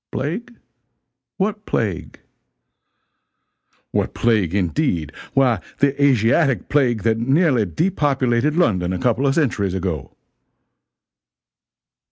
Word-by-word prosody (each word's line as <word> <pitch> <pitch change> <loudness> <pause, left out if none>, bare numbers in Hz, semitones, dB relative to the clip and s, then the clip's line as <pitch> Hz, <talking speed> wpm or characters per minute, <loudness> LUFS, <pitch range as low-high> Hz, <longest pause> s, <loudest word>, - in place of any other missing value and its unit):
"Plague? 190 - -4 0.8
What 210 +2 -2
plague?" 100 -7 -3 1.7
"What - - -1
plague, 105 -7 +1
indeed? 90 - -1 0.2
Why 130 -6 +3 0.2
the 140 -1 +2
Asiatic 130 +1 +2
plague 125 -7 +1
that 110 0 +1
nearly 135 - +2
depopulated 140 - 0
London 95 - +1
a - - -2
couple 125 +3 +1
of 135 - +1
centuries 100 - 0
ago." 85 -7 -4
125 Hz, 95 wpm, -20 LUFS, 100-145 Hz, 1.7 s, Why